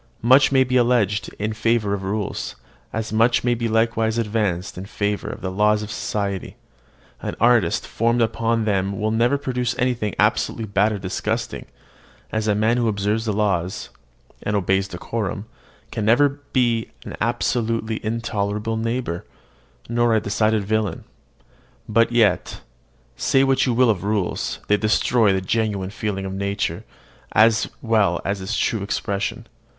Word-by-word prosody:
Much 130 +4 +6
may 135 -1 +5
be 130 0 +1
alleged 120 -5 +2
in 105 +1 -2
favour 110 -2 +1
of 100 - -2
rules, 100 +1 -3 0.4
as 110 0 -4
much 115 +2 +3
may 120 0 +2
be 115 0 -1
likewise 115 0 +1
advanced 105 -5 -1
in 90 - -6
favour 105 0 -2
of - - -7
the 95 - -3
laws 105 +2 +2
of 105 - -7
society: 100 -3 -3 0.7
an - - -4
artist 115 -6 +3
formed 115 +2 0
upon 115 0 +1
them 100 -2 0
will 110 +1 0
never 120 +5 +2
produce 125 -3 -2
anything 120 -5 0
absolutely 115 - +1
bad 100 +1 +2
or 105 - -2
disgusting; 95 -2 -3 0.6
as 110 0 -1
a 105 - +3
man 110 +3 +2
who 120 -2 +1
observes 105 +1 0
the 110 - 0
laws, 95 -4 -1 0.5
and 105 - -1
obeys 95 0 +1
decorum, 100 +2 -4 0.5
can 110 - -3
never 140 +6 +3
be 120 -3 +1 0.2
an - - -6
absolutely 115 -2 -1
intolerable 110 -1 -2
neighbour, 115 -6 -2 0.6
nor 120 0 +2
a - - +4
decided 110 0 +1
villain: 105 -4 -1 0.8
but 115 +2 +3
yet, 115 -3 +2 0.5
say 135 - +2
what 135 0 +2
you - - +2
will 125 -1 +5
of 95 -4 -3
rules, 100 -3 -1
they 105 - +4
destroy 110 +1 +3
the 95 0 0
genuine 100 -1 -1
feeling 100 -2 -3
of 95 - -4
nature, 100 +1 -2 0.5
as 110 +1 +4
well 105 -7 +2
as 100 0 -2
its 100 +4 -2
true 110 - 0
expression. 100 0 -2
110 Hz, 155 wpm, -22 LUFS, 100-115 Hz, 0.8 s, Much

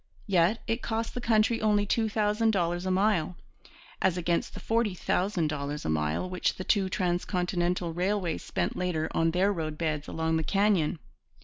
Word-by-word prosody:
Yet 190 +2 +2
it 230 +2 -1
cost 225 0 -2
the 245 - -4
country 225 0 +2
only 210 -1 +3
two 220 +2 +1
thousand 215 +1 +1
dollars 175 -3 0
a - - +1
mile, 185 -3 +1 0.7
as 185 -1 +2
against 170 -1 -1
the - - -6
forty 225 -4 0
thousand 180 -3 0
dollars 145 0 -4
a - - -1
mile 75 - 0
which 180 0 -1
the 185 - -5
two 195 0 +2
transcontinental 180 -1 -1
railways 180 -1 -1
spent - - -2
later 175 -3 -1
on 165 0 +2
their 185 +4 +2
roadbeds 155 -3 -3
along 160 0 0
the 160 - -1
canyon. 195 -2 +2
180 Hz, 170 wpm, -28 LUFS, 165-210 Hz, 0.7 s, only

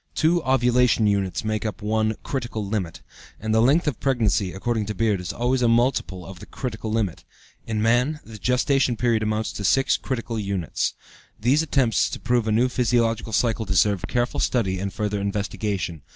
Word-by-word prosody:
Two 170 +2 +2
"ovulation 125 -3 +3
units" 100 -2 0
make 110 0 -1
up 105 -2 -5
one 110 +1 +1
"critical 120 -5 -3
unit," 95 -7 -3 0.4
and 110 +1 -2
the 110 - +4
length 140 +9 +4
of 150 -6 -2
pregnancy, 110 -8 +1
according 110 +2 -2
to 105 - -4
Beard, 105 -5 +1
is 90 - -4
always 125 +2 0
a 120 - +3
multiple 115 -6 +1
of 95 -2 -10
the - - -11
"critical 110 -3 -4
unit;" 100 -7 -2 0.4
in 110 -1 -1
man, 125 +7 +2
the 110 -1 -10
gestation 125 0 +1
period 115 -2 +1
amounts 110 0 -1
to 100 - -6
six 135 +6 +3
critical 120 -3 -4
units. 100 -5 -2 0.4
These 130 +8 +3
attempts 135 -7 +2
to - - -6
prove 120 -2 0
a - - +1
new 115 +4 +3
physiological 115 -2 0
cycle 115 +1 +1
deserve 100 -1 +2
careful 120 0 -1
study 95 -7 0
and 100 +1 -3
further 105 -1 -2
investigation. 100 -4 -3
110 Hz, 180 wpm, -24 LUFS, 105-125 Hz, 0.4 s, the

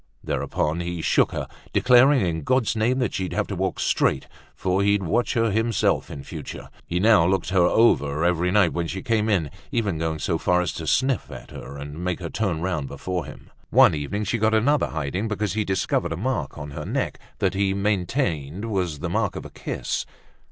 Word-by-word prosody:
Thereupon 80 +3 -1
he 85 0 -3
shook - - +3
her, - - -4 0.3
declaring 125 -1 +5
in 80 -2 -1
God's 125 - +1
name 115 +4 +1
that 125 -5 0
she'd 95 -1 -3
have 105 - 0
to 100 - -5
walk 95 0 -2
straight, - - +1 0.3
for 95 +1 0
he'd 100 0 +2
watch 120 +8 0
her 115 -2 +2
himself 110 +2 +1
in 70 - -7
future. - - -8 0.2
He 90 - -1
now 105 -4 +5
looked 95 -1 0
her 95 -1 +3
over 80 -10 +3
every 90 0 +2
night 95 -3 +3
when 85 -1 -1
she 95 +3 -5
came 110 -2 +1
in, 85 -9 +1 0.2
even 105 -9 0
going 80 -1 -1
so 80 +2 -1
far 90 0 +2
as 90 - 0
to 80 - -6
sniff 130 - +1
at - - -10
her 70 +1 -8
and 75 +4 -7
make 90 -1 -1
her 85 -2 -6
turn 95 -7 -1
round 85 -6 -2
before 85 +4 -4
him. - - -12 0.2
One - - +6
evening 75 +8 -2
she 115 +3 -1
got 110 +1 +3
another 140 +7 +3
hiding 80 +7 -3
because 105 -1 -2
he 110 0 0
discovered 95 -4 0
a - - -5
mark 110 - -2
on 75 -1 -7
her - - -6
neck - - -2 0.2
that - - +1
he 95 0 +1
maintained 100 - -1
was 90 -7 -1
the - - -2
mark - - 0
of - - -6
a - - -9
kiss. - - -3
95 Hz, 210 wpm, -24 LUFS, 80-110 Hz, 0.3 s, One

